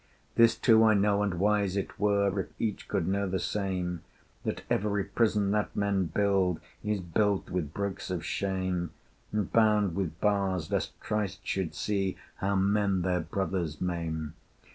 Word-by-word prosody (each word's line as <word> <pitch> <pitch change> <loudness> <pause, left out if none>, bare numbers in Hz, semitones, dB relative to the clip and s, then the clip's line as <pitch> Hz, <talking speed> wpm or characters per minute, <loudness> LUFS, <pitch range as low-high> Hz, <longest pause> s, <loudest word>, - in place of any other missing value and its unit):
This 115 0 +5
too 110 -1 +5
I 110 -1 +6
know 100 0 +3
and 100 -3 0
wise 100 +1 +2
it 100 - -4
were 100 -1 +2
If 95 - -2
each 110 -3 -2
could 95 -5 -1
know 100 0 0
the 95 - 0
same 90 -3 -2 0.4
That - - -3
every 100 -1 +1
prison 105 -3 +1
that 105 0 0
men 100 -2 +1
build 95 0 +1 0.2
Is 105 -1 0
built 95 +3 0
with 85 -5 -2
bricks 100 +1 -3
of 90 -3 -3
shame, 95 -2 -1 0.4
And 105 -3 -2
bound 105 -4 +4
with 90 -3 -3
bars 95 -5 +1
lest - - -2
Christ 105 -3 -2
should 95 -4 -2
see 100 -3 -1 0.2
How 100 +1 0
men 100 -1 +2
their 90 -1 +1
brothers 90 -6 -2
maim. 80 -3 -3
100 Hz, 160 wpm, -29 LUFS, 90-105 Hz, 0.4 s, I